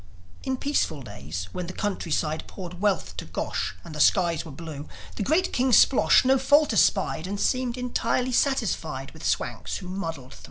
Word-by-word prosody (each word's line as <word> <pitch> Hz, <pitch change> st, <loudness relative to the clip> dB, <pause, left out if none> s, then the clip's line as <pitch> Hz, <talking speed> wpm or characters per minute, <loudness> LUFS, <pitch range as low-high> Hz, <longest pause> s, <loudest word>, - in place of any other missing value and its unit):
In 265 Hz, -1 st, -2 dB
peaceful 175 Hz, -, -1 dB
days 90 Hz, -, -6 dB
when 180 Hz, -, -5 dB
the 180 Hz, -, -6 dB
countryside 165 Hz, -6 st, -2 dB
Poured 180 Hz, -1 st, -8 dB
wealth 205 Hz, -4 st, 0 dB
to -, -, -5 dB
Gosh, -, -, -3 dB
and 160 Hz, -, -10 dB
the 150 Hz, -, -6 dB
skies 170 Hz, -1 st, +3 dB
were 160 Hz, -, -9 dB
blue, 150 Hz, 0 st, -8 dB, 0.3 s
The -, -, -4 dB
great 320 Hz, -, +1 dB
King 255 Hz, +1 st, +2 dB
Splosh 170 Hz, -, +6 dB
no 265 Hz, +1 st, +4 dB
fault 285 Hz, 0 st, +4 dB
espied, 195 Hz, -5 st, +2 dB
And 200 Hz, +1 st, -4 dB
seemed 255 Hz, +1 st, 0 dB
entirely 250 Hz, 0 st, 0 dB
satisfied 270 Hz, +2 st, 0 dB
With -, -, -13 dB
Swanks -, -, -2 dB
who 185 Hz, -, -9 dB
muddled 165 Hz, -9 st, -5 dB
thro'. -, -, -13 dB
190 Hz, 175 wpm, -26 LUFS, 160-255 Hz, 0.3 s, Splosh